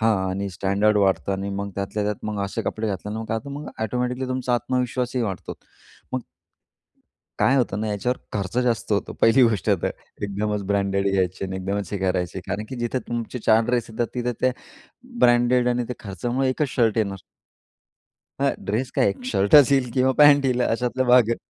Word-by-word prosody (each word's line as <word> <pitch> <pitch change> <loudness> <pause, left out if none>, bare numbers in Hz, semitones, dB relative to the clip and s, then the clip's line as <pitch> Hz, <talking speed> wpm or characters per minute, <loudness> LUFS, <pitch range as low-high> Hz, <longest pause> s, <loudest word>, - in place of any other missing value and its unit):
हां. 110 -2 +3
आणि 100 +1 -3
स्टँडर्ड 100 +3 +1
वाढतं 95 0 +1
आणि 95 +1 -3
मग 100 0 -4
त्यातल्या 100 +1 -3
त्यात 105 0 0
मग 105 -2 -2
असे 110 +3 -3
कपडे 110 +2 -3
घातल्यानं 105 +2 -4
मग - - -5
काय 110 - -1
होतं 115 +5 -6
मग 145 +2 -6
एटोमॅटिकली 125 +3 -2
तुमचा 130 -1 0
आत्मविश्वासही 125 0 -1
वाढतो 95 -4 -4 0.6
मग 130 - 0 1.2
काय 135 - +4
होतं 110 -5 0
ना, 110 - -2
याच्यावर 115 +5 -1 0.2
खर्च 100 +2 -3
जास्त 115 -3 0
होतो 100 - -1
पहिली 120 +3 +5
गोष्ट 110 -5 +2
तर. - - +1 0.3
एकदमच 105 +1 -2
ब्रँडेड 100 0 0
घ्यायचे 95 0 0
आणि 95 0 -4
एकदमच 100 0 -3
हे 100 - -1
करायचे. 90 -1 -1
कारण 105 - -3
की 130 - -6
जिथे 120 +2 -1
तुमचे 120 +1 -3
4 110 +1 +5
ड्रेस 120 -1 0
येतात 115 +1 -1
तिथं 125 0 -1
ते 130 - +4 0.7
ब्रँडेड 120 +1 +4
आणि 125 0 0
त्या 125 - -4
खर्चामुळे 120 +8 -1
1 130 +4 -1
च - - +3
शर्ट 115 -3 +2
येणार. 100 -3 0 1.2
हां, - - +3 0.2
ड्रेस 115 +6 -1
काय - - +3
1 100 +5 -4
शर्टच 125 +5 +5
येईल 130 -3 +2
किंवा 130 0 +3
पॅण्ट 145 -1 +7
येईल 125 -2 +1
अशातला 125 +2 0
भाग 125 -2 +6
आहे. 115 - +1
110 Hz, 185 wpm, -23 LUFS, 100-125 Hz, 1.2 s, पॅण्ट